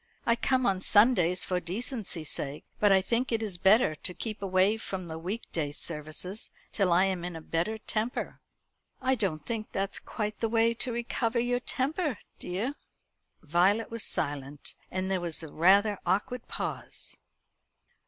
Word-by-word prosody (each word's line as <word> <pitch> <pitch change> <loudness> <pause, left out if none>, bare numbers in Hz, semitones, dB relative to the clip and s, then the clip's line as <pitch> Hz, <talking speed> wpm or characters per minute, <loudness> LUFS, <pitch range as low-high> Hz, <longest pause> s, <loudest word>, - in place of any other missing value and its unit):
I 230 - +4
come 255 +1 +1
on 190 -3 +2
Sundays 200 -5 +5
for 180 -1 0
decency's 185 - -4
sake; 140 +1 -3
but 205 -1 +5
I 190 -1 +5
think 240 +5 0
it 225 -1 +1
is 190 -5 -4
better 195 -2 +5
to 180 +4 -4
keep 215 -3 -5
away 195 +2 +3
from 190 -4 -5
the 160 -1 -6
week 195 +8 -3
day 150 -4 -1
services 155 +6 -2 0.2
till 195 -4 +2
I 180 +3 +5
am 185 -3 -1
in 175 -1 -4
a - - -5
better 170 +7 -1
temper." 220 +2 -3 0.6
"I 260 0 +2
don't 185 - -1
think 225 -2 -3
that's 195 0 -2
quite 210 -1 -4
the 225 - 0
way 230 0 +3
to 245 +2 0
recover 235 0 -1
your 245 +1 +1
temper, 280 - -1 0.2
dear." 205 +10 -2 0.7
Violet 180 +9 +2
was 230 -1 -1
silent, 145 0 -2 0.2
and 190 +1 -2
there 185 -2 +1
was 170 -1 -2
a 160 - -7
rather 200 +5 +4
awkward 225 +5 -1
pause. - - -5
195 Hz, 165 wpm, -29 LUFS, 175-230 Hz, 0.7 s, Sundays